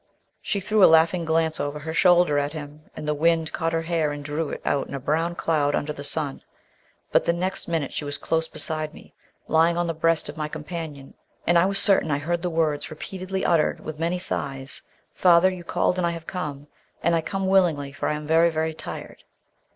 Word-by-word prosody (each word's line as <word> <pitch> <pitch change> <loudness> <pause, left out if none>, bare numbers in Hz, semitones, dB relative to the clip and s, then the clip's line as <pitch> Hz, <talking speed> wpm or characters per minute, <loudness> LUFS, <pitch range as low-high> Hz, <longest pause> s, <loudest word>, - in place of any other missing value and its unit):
She 200 - -1
threw 210 +1 +2
a - - +9
laughing 165 +2 +4
glance 160 0 +1
over 145 +1 -2
her 160 +2 -5
shoulder 175 -4 +4
at 145 +1 -2
him, 150 0 -9
and 150 - -6
the 150 - +2
wind 165 +1 +1
caught 165 -1 -1
her 165 0 -1
hair 160 -2 0
and 145 0 -6
drew 155 +1 -2
it - - -5
out 140 - 0
in - - -6
a - - -3
brown 165 +5 0
cloud 150 -4 +1
under 150 +1 -2
the 145 - -8
sun. 145 -1 -3 0.7
But - - +3
the 170 - +2
next 185 +2 -3
minute 160 -5 -2
she - - -3
was 145 0 -3
close 160 +2 -1
beside 155 -1 -4
me, - - -15 0.3
lying 165 +2 +3
on 175 - +1
the 165 - -1
breast 165 0 +1
of 145 - -7
my 155 -1 -2
companion, 150 -2 -7 0.3
and 175 - +3
I 170 +2 +5
was 195 0 +1
certain 195 -5 +5
I 140 - +1
heard 170 +4 -2
the 180 - -1
words 160 -3 0
repeatedly 185 +4 -5
uttered 165 -3 +2
with 155 -1 -7
many 170 +2 0
sighs: 135 -6 -4 0.3
"Father, 180 +1 +5
you 180 -2 -7
called, 180 +1 0
and 175 - +2
I 170 0 -2
have 165 - -13
come. 150 -6 -5 0.4
And 170 - +3
I 165 - +2
come 195 +4 -3
willingly, 175 -7 +2
for 145 - -3
I - - +1
am 150 0 -6
very, 165 +2 +4
very 160 0 -1
tired." - - -8
160 Hz, 220 wpm, -24 LUFS, 150-170 Hz, 0.7 s, a